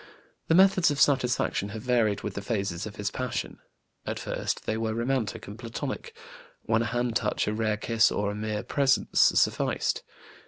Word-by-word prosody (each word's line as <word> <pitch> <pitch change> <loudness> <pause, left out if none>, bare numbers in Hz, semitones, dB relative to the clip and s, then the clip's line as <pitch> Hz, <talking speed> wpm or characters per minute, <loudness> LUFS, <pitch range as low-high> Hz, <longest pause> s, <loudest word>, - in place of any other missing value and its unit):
The 165 - +4
methods 190 -2 +5
of 145 -1 -2
satisfaction 125 -7 +2
have 110 +1 -7
varied 115 -5 +1
with 105 - -3
the 100 - -5
phases 100 -3 -2
of 105 - -9
his 105 -1 -3
passion. 125 -1 -4 0.4
At - - -4
first - - -3
they 110 - -1
were 110 0 -2
romantic 120 -2 -1
and 105 +2 -10
Platonic, 120 - -5 0.5
when 115 - +1
a - - 0
hand 120 +1 -1
touch, 105 -2 0
a 105 - 0
rare 110 -1 0
kiss, 115 +1 +3
or 100 0 -1
mere 105 0 -3
presence 135 -2 +2
sufficed. - - +2
115 Hz, 170 wpm, -27 LUFS, 105-125 Hz, 0.5 s, methods